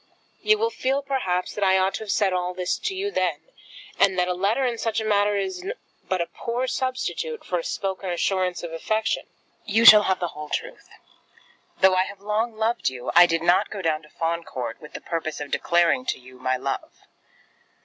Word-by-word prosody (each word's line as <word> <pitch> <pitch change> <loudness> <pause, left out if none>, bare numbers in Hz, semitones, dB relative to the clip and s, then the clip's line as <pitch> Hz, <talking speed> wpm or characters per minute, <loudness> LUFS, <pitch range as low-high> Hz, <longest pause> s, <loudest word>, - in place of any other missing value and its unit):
You 430 0 +4
will 455 +2 0
feel, 270 - -1
perhaps, 190 -10 -1
that 205 - -2
I 190 0 +4
ought 190 +1 +1
to - - -3
have 210 - -3
said 200 -4 +2
all 180 0 -2
this 180 -1 -1
to 385 - -3
you 400 +2 -2
then, - - -1 0.6
and 195 -1 +4
that 180 0 +2
a 180 - 0
letter 200 +9 +1
in 235 -2 -2
such 225 -1 -1
a 220 - -3
matter 205 -1 +2
is 365 - -3 0.5
but 185 -2 +1
a - - 0
poor 235 +9 -3
substitute 265 - -3
for - - -1
a - - -5
spoken 190 - -3
assurance 180 0 -1
of 170 -1 -6
affection. 215 +6 -1 0.4
You 225 +3 +2
shall 210 -2 +11
have 190 -2 0
the 175 - -2
whole 150 -1 -9
truth. - - -5 0.9
Though 190 0 +6
I 185 0 +3
have 200 0 -9
long 215 +3 -1
loved 225 - 0
you, 125 -1 -5
I 175 0 +9
did 165 -1 -1
not 175 +1 +3
go 200 -3 -6
down 155 -1 0
to 150 - -18
Fawn 170 +1 -2
Court 120 -6 -6
with 150 - -12
the - - -7
purpose 165 -2 -4
of 145 -1 -6
declaring 175 +10 +2
to - - -1
you 130 0 -15
my 130 0 0
love. 135 +1 -5
190 Hz, 210 wpm, -24 LUFS, 170-225 Hz, 0.9 s, shall